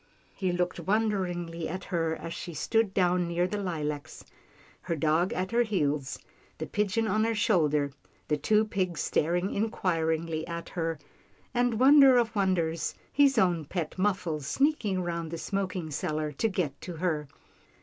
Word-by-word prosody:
He 185 -2 -1
looked 180 0 -1
wonderingly 175 -4 -1
at 185 +2 -5
her 165 -2 -1
as 165 +1 -6
she 170 -2 -7
stood 225 +4 +1
down 180 -2 +2
near 170 +1 +1
the 205 +3 -3
lilacs, 150 -6 -4 0.6
her 170 - -2
dogs 160 +4 +2
at 185 +2 -2
her 235 +1 +3
heels, 150 - 0 0.4
the - - -4
pigeon 210 +2 0
on 215 0 +2
her 225 0 +1
shoulder, 150 - +2 0.4
the 150 - +2
two 215 +8 +2
pigs 185 -6 -2
staring 175 +5 0
inquiringly 165 -6 -1
at 170 0 -5
her, 165 -2 -2 0.6
and, 245 -2 +1
wonder 270 -1 +8
of 235 -1 +1
wonders, 170 -5 0 0.2
his 275 -2 +4
own 175 -6 +3
pet 160 +1 -4
Muffles 180 -7 0
sneak 295 +1 +2
ing 190 -3 0
round 170 -2 -3
the 165 - -5
smoking 185 -1 -3
cellar 155 +1 -2
to 150 +10 0
get 165 -8 -2
to 180 - -6
her. 155 -3 -1
180 Hz, 160 wpm, -28 LUFS, 160-205 Hz, 0.6 s, wonder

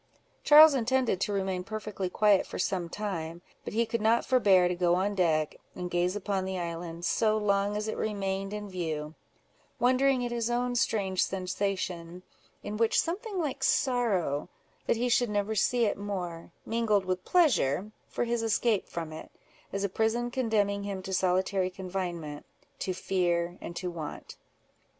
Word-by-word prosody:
Charles 305 +1 +9
intended 255 -5 +1
to - - 0
remain 190 -2 -1
perfectly 210 -2 -4
quiet 205 +1 +3
for - - -6
some 180 -1 -1
time, 170 -4 -4 0.2
but - - -6
he 230 +1 +3
could 230 0 -2
not 225 +2 +3
forbear 195 -8 +4
to 180 - 0
go 175 -1 +2
on 195 +3 0
deck, 160 -5 +1 0.2
and 180 -1 -5
gaze 175 +2 +1
upon 200 -1 -1
the 190 0 -3
island, 170 0 -5
so 215 -1 +2
long 205 0 +1
as 210 +1 -3
it 220 - -2
remained 195 -2 -2
in 210 0 -5
view, 160 -5 -4 0.6
wondering 255 +1 +3
at 240 - -3
his 235 -1 -1
own 245 +1 0
strange 195 -5 +1
sensation, 185 -2 -3 0.4
in 210 +1 -4
which 225 0 +3
something 395 +4 -2
like 280 -5 -2
sorrow, 210 - +1 0.4
that - - +2
he 245 +2 0
should 245 -1 +2
never 205 +1 0
see 235 +3 +2
it 205 - -1
more, 180 -5 -5
mingled 220 -4 +1
with 185 0 -2
pleasure 215 - +2 0.2
for - - -2
his 235 -1 -1
escape 225 -1 +1
from 165 -2 -5
it, 155 - -9 0.4
as 195 0 -2
a - - +2
prison 225 +4 0
condemning 215 -6 +1
him 200 -2 -5
to 190 - -5
solitary 185 +1 +1
confinement, 180 -5 -5 0.4
to 190 - -2
fear, 175 -2 0
and 170 - -7
to 180 0 -3
want. 160 -3 -7
200 Hz, 165 wpm, -29 LUFS, 180-225 Hz, 0.6 s, Charles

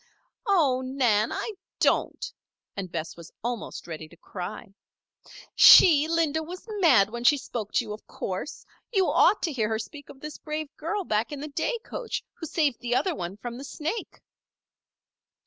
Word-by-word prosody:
"Oh, 295 -10 +3
Nan! 245 -5 +2
I - - -3 0.3
don't," - - +1 0.4
and 185 -3 -5
Bess 160 - -4
was 170 -1 -12
almost 240 -1 -4
ready 160 -2 -7
to 170 - -18
cry. 195 +4 -7 0.8
"She, 310 -4 +9
Linda, 320 -2 +1
was 355 +4 -8 0.2
mad 235 - +5
when 235 +1 -5
she 290 +4 +6
spoke 230 -5 -5
to - - +2
you, 210 - -5
of 210 - -11
course. 190 +10 -5 0.3
You 385 -5 +2
ought 415 - +4
to 325 - 0
hear 220 -5 0
her 220 - 0
speak 285 +6 -9
of 265 - -12
this 300 +1 -8
brave 305 -1 -5
girl 360 +6 -2
back 220 -5 0
in 290 - -5
the 300 +2 -6
day 470 - -1
coach, - - -4
who 325 - -7
saved 290 -6 +1
the 245 0 -1
other 360 +7 +1
one 180 - -5
from 240 +2 -7
the - - -7
snake." 315 +9 -5
270 Hz, 175 wpm, -27 LUFS, 215-315 Hz, 0.8 s, She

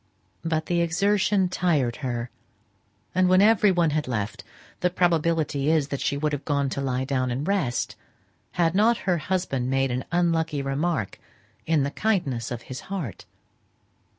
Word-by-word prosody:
But 160 -1 -1
the 175 -1 +1
exertion 195 +3 +2
tired 155 -10 0
her; 120 -3 -3 0.8
and 185 0 +3
when 185 0 +5
every 210 0 +5
one 170 -3 +2
had 150 -1 -1
left, 105 -4 -3 0.4
the 180 - +2
probability 165 -5 +1
is 155 -3 +2
that 140 - -3
she 140 - 0
would 150 +1 -1
have 145 - -3
gone 140 -2 0
to 140 - -3
lie 130 -1 -1
down 130 -2 0
and 130 +5 -3
rest, 180 -12 0 0.6
had 170 -2 +2
not 220 +5 +4
her 180 -3 +2
husband 150 -7 -1
made 135 0 +1
an 125 +1 -2
unlucky 165 -4 +1
remark 135 - -1 0.5
in 155 -3 +3
the 140 - -2
kindness 145 - -1
of 120 -1 -5
his 130 - -7
heart. 180 - -5
155 Hz, 160 wpm, -25 LUFS, 135-180 Hz, 0.8 s, when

